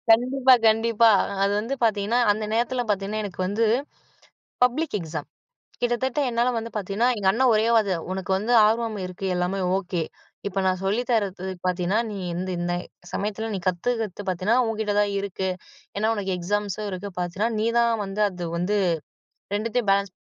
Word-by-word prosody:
கண்டிப்பா. 255 +3 +5
கண்டிப்பா. 225 +1 +4 0.2
அ - - -4
அது 200 - +2
வந்து 230 +6 -3
பார்த்தீங்கன்னா, 220 +1 +2
அந்த 215 +1 -2
நேரத்தில 245 +2 +1
பார்த்தீங்கன்னா 205 +1 -1
எனக்கு 195 -3 -7
வந்து, 215 +4 +1 1.0
பப்ளிக் 280 +3 +1
எக்ஸாம். 160 -3 -5 0.5
கிட்டத்தட்ட 245 +3 0
என்னால 240 +1 +1
வந்து 230 0 -3
பார்த்தீங்கன்னா 210 +4 +1
எங்க 200 -2 0
அண்ணன் 250 +4 +3
ஒரே 215 +1 +3
வார்த்த, 200 -5 +2
உனக்கு 190 0 -3
வந்து 215 +5 -2
ஆர்வம் 225 0 +1
இருக்கு 180 +1 -6
எல்லாமே 180 +2 -1 0.2
ஓகே. 180 -2 -2 0.5
இப்ப 195 0 -2
நான் 185 0 +1
சொல்லித்தர்றது 205 -3 0 0.2
பார்த்தீன்னா, 180 +2 0
நீ 205 - -5 0.2
வந்து 185 +1 -3
இந்த 175 0 -1 0.4
சமயத்தில 215 +2 -2
நீ 195 - -2
கத்துக்கிறது 205 +2 -1
பார்த்தீன்னா, 185 +5 +1
உன்கிட்ட 220 -2 -1
தான் 205 -1 +2
இருக்கு. 190 -1 -3 0.5
ஏனா, 215 +2 +1
உனக்கு 195 -3 -2
எக்ஸாம்ஸும் 205 +3 -2
இருக்கு. 195 +1 -5
பார்த்தீன்னா, 180 +5 -1
நீ 215 - +1
தான் 235 0 +3
வந்து 195 +1 -3
அது 180 -2 -7
வந்து 180 +5 0 0.8
2த்தையும் 225 +1 -1
பேலன்ஸ் 200 -1 +2
205 Hz, 155 wpm, -24 LUFS, 190-230 Hz, 1.0 s, கண்டிப்பா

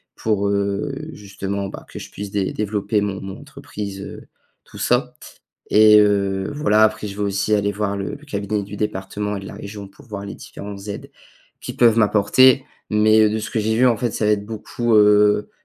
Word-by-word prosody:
pour, 100 -2 0
heu, 100 +7 -1 0.2
justement, 100 -2 -5
bah, - - -10
que - - -8
je - - -10
puisse 100 -1 -7
dé 100 -2 -1
développer 105 0 -1
mon 100 -1 -3
mon 95 0 -8
entreprise, 100 -2 -8
heu, - - -9 0.4
tout - - -13
ça. - - +1 0.6
Et, 105 0 +7
heu, 100 -2 +1
voilà, 110 -7 +3
après 110 -1 0
je 100 - -8
vais - - -1
aussi 100 +2 0
aller 100 0 +1
voir 100 0 -2
le 100 -1 -4
le 150 - -14
cabinet 100 -4 -2
du 105 +1 -8
département 105 0 -3
et - - -5
de 95 - -10
la - - -8
région 100 0 -8
pour 95 - -19
voir 100 -3 -6
les 100 - -7
différentes 100 0 -9
aides 100 - -7 0.5
qui - - -6
peuvent 115 -2 +4
m'apporter. 115 +5 +4 0.3
Mais 110 0 +4
de 110 - -1
ce 110 0 -5
que - - -1
j'ai 110 +1 0
vu, 125 +2 +4
en 120 - +3
fait, 120 +1 -1
ça 110 - -1
va 105 - +4
être 100 -1 -1
beaucoup, 115 +2 -2
heu, 105 0 +4
105 Hz, 205 wpm, -21 LUFS, 100-110 Hz, 0.6 s, Et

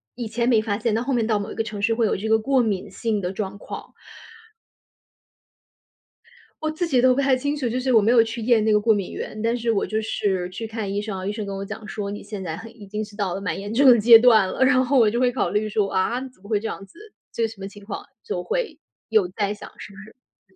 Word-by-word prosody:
以 240 -2 -4
前 235 +2 -1
没 220 -3 +4
发 205 -2 -2
现， 225 -1 -1
但 225 - +1
后 270 +1 -1
面 230 -2 +1
到 215 -2 +1
某 205 - -5
一 - - -7
个 225 - -1
城 210 -2 -6
市 225 +2 +2
会 230 -1 +2
有 - - +1
这 215 +3 -4
个 220 0 +4
过 265 +2 +2
敏 205 -3 -2
性 215 -1 -2
的 180 +1 -2
状 195 0 -5
况。 - - -9 2.7
我 310 - 0
自 335 +2 -2
己 255 -5 +3
都 255 0 +5
不 280 - +1
太 270 -1 +3
清 285 +3 -2
楚， 255 -5 -2
就 250 +3 -1
是 255 -1 0
我 220 - +6
没 220 +3 +3
有 235 -2 +6
去 230 +1 -5
验 225 -1 +3
那 220 - +2
个 210 - +4
过 220 +1 +3
敏 200 -3 -3
原。 215 - -6
但 230 +1 +1
是 235 -1 0
我 200 - 0
就 220 0 -2
是 190 -4 -1
去 225 +4 -6
看 220 -3 -4
医 205 +1 -1
生 210 -3 -5
啊， 185 - -6
医 205 - -1
生 210 -1 -5
跟 200 0 -5
我 195 - -4
讲 210 +2 -8
说： 200 0 -4
“你 205 - -6
现 205 -2 -7
在 160 -2 -4
很 225 +1 -11
已 200 - -11
经 210 +2 -3
是 205 - -15
到 195 -4 -2
了 195 - -5
蛮 200 - -3
严 205 +2 -6
重 275 +4 +3
的 235 -2 +7
阶 230 +1 +9
段 225 -5 +5
了。” 260 - 0
然 260 -1 +4
后 270 +2 +2
我 225 -3 +5
就 235 +3 -1
会 250 -1 +3
考 260 - -1
虑 215 +1 -1
说： 205 -2 0
“啊， 230 +7 0
怎 250 - -28
么 200 - -14
会 210 -2 +2
这 225 - -4
样 195 - -6
子， 195 - -22 0.3
这 230 -1 0
什 220 -2 -12
么 195 - -5
情 205 0 -13
况？” - - -6 0.2
就 - - -3
会 - - -3 0.3
有 215 -5 +3
在 205 +2 -2
想， 210 - -10
是 - - -10
不 195 - -15
是 215 -3 -19
220 Hz, 305 characters per minute, -23 LUFS, 205-240 Hz, 2.7 s, 阶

